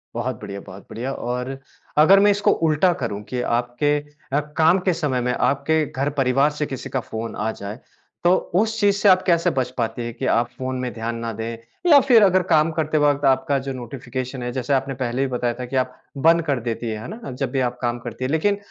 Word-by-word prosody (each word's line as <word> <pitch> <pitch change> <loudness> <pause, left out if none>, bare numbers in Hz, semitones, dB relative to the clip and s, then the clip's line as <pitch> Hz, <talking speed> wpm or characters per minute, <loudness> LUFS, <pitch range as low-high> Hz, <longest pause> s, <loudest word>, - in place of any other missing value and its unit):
बहुत 120 0 -3
बढ़िया, 100 0 -6
बहुत 95 0 -12
बढ़िया। 125 +4 -4
और 125 +2 -4 0.4
अगर 185 +6 +7
मैं 205 +1 +5
इसको 205 0 +2 0.2
उल्टा 155 +4 +3
करूँ 105 -2 -3
कि 125 -1 -2 0.2
आपके 135 +5 0 0.4
अ, 145 - +4 0.2
काम 165 +4 +5
के 185 0 +1
समय 145 -7 -1
में, 125 0 0
आपके 150 +3 +1
घर 140 +2 -1
परिवार 135 +3 +3
से 150 0 -2
किसी 130 -3 -6
का 130 - -1
फ़ोन 115 -1 -6
आ 110 +1 -1
जाए, 105 +2 -7 0.4
तो 175 +2 +5 0.2
उस 220 +3 +1
चीज़ 200 -1 +3
से 205 0 +4
आप 185 0 +6
कैसे 170 -2 +3
बच 125 -1 +1
पाती 120 0 -2
हैं 120 - -5
कि 115 - -5
आप 120 +1 +2
फ़ोन 130 0 -3
में 125 -1 -3
ध्यान 115 +1 -4
ना 115 0 -4
दें? 115 +1 -5 0.3
या 290 -3 +9
फिर 230 -5 +7
अगर 185 -1 +4
काम 165 -2 +3
करते 155 -1 0
वक़्त 145 -1 +2
आपका 135 +1 +2
जो 135 - -2
नोटिफ़िकेशन 130 0 -6
है, 125 - -3
जैसे 130 +2 -2
आपने 135 0 0
पहले 125 0 -2
भी 135 - +1
बताया 120 -1 0
था 125 - -3
कि 125 - -6
आप 130 -1 0 0.3
बंद 165 +1 +6
कर 140 -4 0
देती 115 0 -3
हैं, 110 -1 -4
है - - -7
ना? 225 - -8
जब 135 +2 -3
भी 135 - 0
आप 125 - -15
काम 120 -1 -1
करती 120 +1 -7
हैं। 130 - -2
लेकिन 200 +6 +2
130 Hz, 235 wpm, -22 LUFS, 120-155 Hz, 0.4 s, या